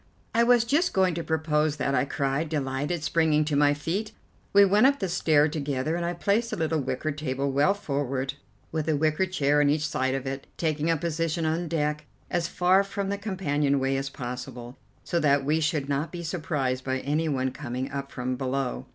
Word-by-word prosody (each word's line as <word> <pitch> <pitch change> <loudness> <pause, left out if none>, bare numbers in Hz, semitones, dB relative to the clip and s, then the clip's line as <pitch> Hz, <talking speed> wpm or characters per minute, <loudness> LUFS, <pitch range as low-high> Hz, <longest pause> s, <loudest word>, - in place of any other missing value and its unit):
"I 230 - +3
was 240 -1 +5
just 295 +9 +1
going 190 -2 +3
to 165 +1 -3
propose 155 -2 +1
that," 140 0 0
I 130 0 +2
cried, 140 +2 -1
delighted, 145 +2 -2
springing 155 -1 +2
to 150 -1 -1
my 145 0 +4
feet. 190 +9 -3 0.4
We 200 0 +7
went 205 +6 +5
up 280 0 +2
the 195 - -2
stair 155 -4 +3
together 145 -1 -2
and 175 - -2
I 170 +1 -1
placed 205 +6 0
a - - -1
little 160 -1 0
wicker 135 +3 -2
table 140 -2 -2
well 145 +9 +3
forward, 140 -7 -2 0.4
with 160 -1 -2
a 155 - +2
wicker 155 +5 +1
chair 145 -5 +2
on 145 - +4
each 150 +1 +1
side 130 -2 0
of 135 0 -4
it, 135 +1 -5
taking 155 -1 0
a 165 - +3
position 165 +1 -1
on 165 +2 0
deck 150 -1 -1 0.3
as 170 -1 0
far 180 +3 +3
from 200 0 -4
the 200 - -1
companion 150 -9 0
way 135 +1 0
as 135 0 -2
possible, 125 -1 -7 0.3
so 170 - 0
that 140 -3 +3
we 155 +3 +2
should 155 -3 0
not 145 +3 -1
be 175 -1 -6
surprised 150 -6 -2
by 130 0 -1
any 155 +3 0
one 130 -2 0
coming 130 -1 -5
up 140 0 -5
from 125 0 -3
below. 130 - -2
150 Hz, 205 wpm, -26 LUFS, 135-170 Hz, 0.4 s, We